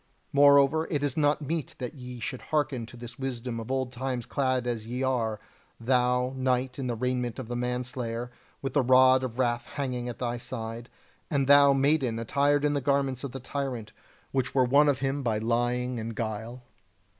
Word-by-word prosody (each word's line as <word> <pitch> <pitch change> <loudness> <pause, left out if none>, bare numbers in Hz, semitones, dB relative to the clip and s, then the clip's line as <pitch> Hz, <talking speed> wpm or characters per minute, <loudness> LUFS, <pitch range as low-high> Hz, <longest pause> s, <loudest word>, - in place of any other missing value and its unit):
Moreover, 140 +2 +5
it 145 -3 -1
is 145 -3 0
not 150 0 +2
meet 160 +1 -3
that 125 +3 -5
ye 125 -3 -9
should 120 +2 -4
hearken 145 -6 -1
to 120 - -12
this 120 +2 -10
wisdom 125 -3 -4
of 115 - -7
old 130 -1 -1
times 125 -1 -3
clad 130 -2 0
as 115 -3 -3
ye 125 +3 -3
are; 115 -5 0 0.4
thou, 125 +1 +1
knight, 130 0 0
in 130 - -2
the 120 - -1
raiment 125 0 -2
of 130 -4 -6
the 120 - -4
manslayer, 125 -1 -3 0.3
with 135 - -3
the 145 - +4
rod 130 +1 +5
of 125 -2 -4
wrath 120 -2 0
hanging 125 -4 -3
at 120 - -6
thy 120 -1 -2
side; 115 -1 -6 0.4
and 140 -2 +1
thou, 140 0 +7
maiden, 135 -4 +2
attired 140 +5 +2
in 145 - +2
the 140 - 0
garments 135 -1 0
of 140 - -4
the 135 - -6
tyrant, 130 -5 -4 0.4
which 130 -1 -1
were 130 -2 +5
won 145 +4 +5
of 140 - +2
him 135 +1 -1
by 115 -5 0
lying 120 +2 0
and 115 0 -5
guile." 115 +3 -4
125 Hz, 190 wpm, -28 LUFS, 120-135 Hz, 0.4 s, thou